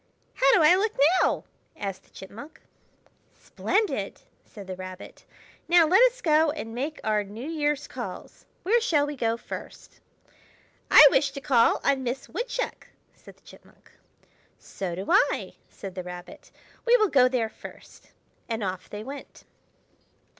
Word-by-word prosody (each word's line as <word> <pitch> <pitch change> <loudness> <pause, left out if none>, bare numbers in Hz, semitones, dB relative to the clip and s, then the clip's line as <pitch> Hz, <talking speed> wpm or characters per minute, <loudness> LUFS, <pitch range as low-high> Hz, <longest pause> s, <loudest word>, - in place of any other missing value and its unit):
"How 275 - +3
do 340 - +4
I 305 +3 +7
look 425 +3 0 0.3
now?" - - +1 0.3
asked 195 -1 -6
the - - -27
Chipmunk. 225 +10 -12 0.8
"Splendid!" 425 +1 -2 0.2
said 205 -3 -12
the 185 0 -6
Rabbit. 185 0 -10 0.4
"Now 345 -1 +6
let 365 +8 +4
us - - -18
go 315 -1 +4
and 290 -7 -5
make 280 +6 -4
our 215 -1 +1
New 215 +7 -9
Year's 295 -3 -1
calls. - - -9 0.2
Where 460 +5 +2
shall 300 -10 +2
we 295 0 -5
go 230 -3 -1
first?" - - -10 0.9
"I 300 - +10
wish 280 +1 +2
to 275 - -6
call 260 -5 +3
on 275 -1 +1
Miss 255 +1 -4
Woodchuck!" - - -4 0.3
said - - -17
the - - -31
Chipmunk. - - -19 0.7
"So 180 -3 -6
do 190 +2 -6
I," 390 - +2 0.2
said 195 -2 -9
the 185 - -5
Rabbit. 180 0 -10 0.3
"We 485 +1 +5
will 430 -4 +2
go 255 -5 +5
there 240 -4 -1
first." - - -14 0.4
And 225 -1 -3
off 185 -1 -5
they 210 0 -7
went. 275 +4 -10
270 Hz, 155 wpm, -26 LUFS, 205-320 Hz, 0.9 s, I